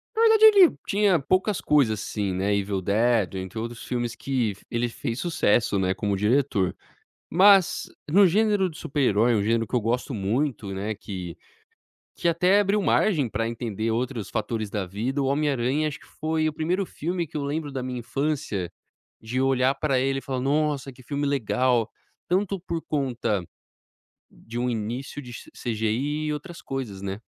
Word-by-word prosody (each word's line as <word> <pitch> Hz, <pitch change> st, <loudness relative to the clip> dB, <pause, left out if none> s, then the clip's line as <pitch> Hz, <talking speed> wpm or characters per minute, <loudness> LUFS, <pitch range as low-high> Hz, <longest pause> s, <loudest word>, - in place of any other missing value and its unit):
na 450 Hz, -, +1 dB
verdade 445 Hz, -1 st, +6 dB
ele 400 Hz, -5 st, +7 dB
tinha 200 Hz, -3 st, +3 dB
poucas 185 Hz, +7 st, +1 dB
coisas 130 Hz, -8 st, +2 dB
assim, 100 Hz, -2 st, -2 dB
né, 100 Hz, +3 st, +1 dB
Evil 100 Hz, -1 st, -1 dB
Dead, 110 Hz, -1 st, +2 dB
entre 95 Hz, +3 st, -6 dB
outros 115 Hz, +1 st, -5 dB
filmes 120 Hz, -1 st, -3 dB
que 125 Hz, -7 st, -1 dB
ele 120 Hz, 0 st, 0 dB
fez 115 Hz, +1 st, -4 dB
sucesso, 120 Hz, -, +1 dB
né, 95 Hz, 0 st, +1 dB
como 100 Hz, -2 st, -1 dB
diretor. 105 Hz, -3 st, +1 dB, 0.6 s
Mas 195 Hz, +1 st, +5 dB, 0.2 s
no 200 Hz, +5 st, +6 dB
gênero 205 Hz, 0 st, +2 dB
do 160 Hz, -, -13 dB
super-herói, 120 Hz, -5 st, +2 dB
um 105 Hz, -, +2 dB
gênero 115 Hz, +1 st, +1 dB
que 125 Hz, -, -3 dB
eu 120 Hz, -, +2 dB
gosto 120 Hz, +5 st, -1 dB
muito, 110 Hz, 0 st, -1 dB
né, 105 Hz, +3 st, -3 dB
que 90 Hz, -5 st, -7 dB, 0.9 s
que 175 Hz, -, -1 dB
até 180 Hz, +4 st, +4 dB
abriu 205 Hz, 0 st, +2 dB
margem 160 Hz, -, +2 dB
pra 115 Hz, +1 st, -2 dB
entender 115 Hz, -1 st, -3 dB
outros 120 Hz, -2 st, -2 dB
fatores 110 Hz, 0 st, -2 dB
da 100 Hz, -1 st, -2 dB
vida, 115 Hz, +10 st, -2 dB
o 135 Hz, -, 0 dB
Homem 145 Hz, +2 st, +1 dB
Aranha 135 Hz, +4 st, 0 dB
acho 150 Hz, -2 st, -4 dB
que -, -, -18 dB
foi 155 Hz, 0 st, +1 dB
o -, -, -2 dB
primeiro 175 Hz, +6 st, -1 dB
filme 170 Hz, 0 st, -3 dB
que 155 Hz, -, -8 dB
eu 145 Hz, -, -2 dB
lembro 145 Hz, +1 st, -3 dB
da 135 Hz, -, -4 dB
minha 125 Hz, -1 st, -4 dB
infância, 135 Hz, -, -2 dB, 0.5 s
de 120 Hz, +4 st, -2 dB
olhar 135 Hz, 0 st, +3 dB
pra 140 Hz, -4 st, 0 dB
ele 135 Hz, +1 st, 0 dB
e -, -, -12 dB
falar: 130 Hz, -1 st, -3 dB
"Nossa, 145 Hz, 0 st, 0 dB
que 130 Hz, -, -16 dB
filme 145 Hz, +3 st, -3 dB
legal," 125 Hz, -3 st, +1 dB, 0.4 s
tanto 195 Hz, +1 st, 0 dB
por 170 Hz, -2 st, -4 dB
conta 120 Hz, -, -1 dB, 0.9 s
de 115 Hz, +1 st, -8 dB
um 125 Hz, -, 0 dB
início 120 Hz, +5 st, -4 dB
de 125 Hz, -, -10 dB, 0.2 s
CGI 120 Hz, +7 st, -1 dB
e 150 Hz, -, 0 dB
outras 165 Hz, +3 st, -7 dB
coisas, 120 Hz, -8 st, -5 dB
né? 100 Hz, +1 st, -4 dB
130 Hz, 175 wpm, -25 LUFS, 110-155 Hz, 0.9 s, ele